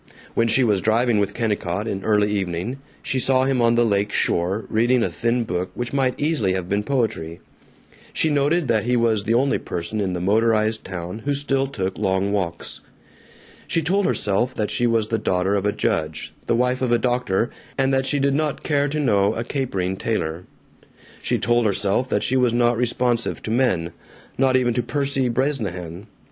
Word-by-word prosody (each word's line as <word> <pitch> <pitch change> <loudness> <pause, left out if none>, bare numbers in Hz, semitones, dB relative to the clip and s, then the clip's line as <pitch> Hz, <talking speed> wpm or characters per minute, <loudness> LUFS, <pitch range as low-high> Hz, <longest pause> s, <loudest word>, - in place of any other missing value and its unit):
When 115 - +2
she 115 +4 +3
was 105 -5 +2
driving 115 +1 +2
with 100 0 -1
Kennicott, 105 -3 -1
in 95 -3 -3
early 105 -1 +2
evening, 95 +5 -2 0.2
she 130 - -1
saw 130 0 +3
him 130 -2 +1
on 115 0 +4
the 120 0 +3
lake 100 -1 +1
shore, 95 +6 0
reading 120 +2 +2
a - - 0
thin 120 +1 0
book 90 -3 -3
which 120 +1 -4
might 130 -2 0
easily 145 - +1
have 95 -2 -3
been 100 +2 0
poetry. 110 -10 -2 0.7
She 160 - +1
noted 145 +3 +1
that 115 -2 +1
he 125 0 +2
was 110 -3 +1
the 115 +1 +2
only 135 +3 +2
person 90 +5 -4
in 95 -2 -1
the 90 - -2
motorized 110 +3 +1
town 90 +2 -6
who 140 +4 -1
still 135 -1 0
took 95 -7 -4
long 95 -1 0
walks. 90 -4 -3 0.9
She 165 - 0
told 195 +4 +1
herself 115 +6 0
that 105 -1 -1
she 120 - +1
was 115 -2 +1
the 115 - 0
daughter 95 -1 0
of 100 0 +1
a - - +2
judge, 80 -5 -2
the - - +2
wife 125 +2 +1
of 125 -2 0
a 120 - +5
doctor, 120 -3 0 0.3
and 135 0 +2
that 135 0 +1
she 145 - +2
did 140 0 +2
not 150 0 -1
care 145 -2 +1
to 150 +2 -2
know 105 -6 +2
a 115 - -2
capering 95 -9 -2
tailor. 90 -6 -2 0.8
She - - 0
told 120 +1 +2
herself 100 +5 0
that 105 - 0
she 130 - 0
was 125 -3 +3
not 120 0 +3
responsive 120 0 0
to 110 - -4
men... 95 -9 +1 0.4
not 130 -1 +3
even 120 -2 +1
to 125 - 0
Percy 135 +1 -1
Bresnahan. 105 - -2
115 Hz, 195 wpm, -22 LUFS, 100-130 Hz, 0.9 s, a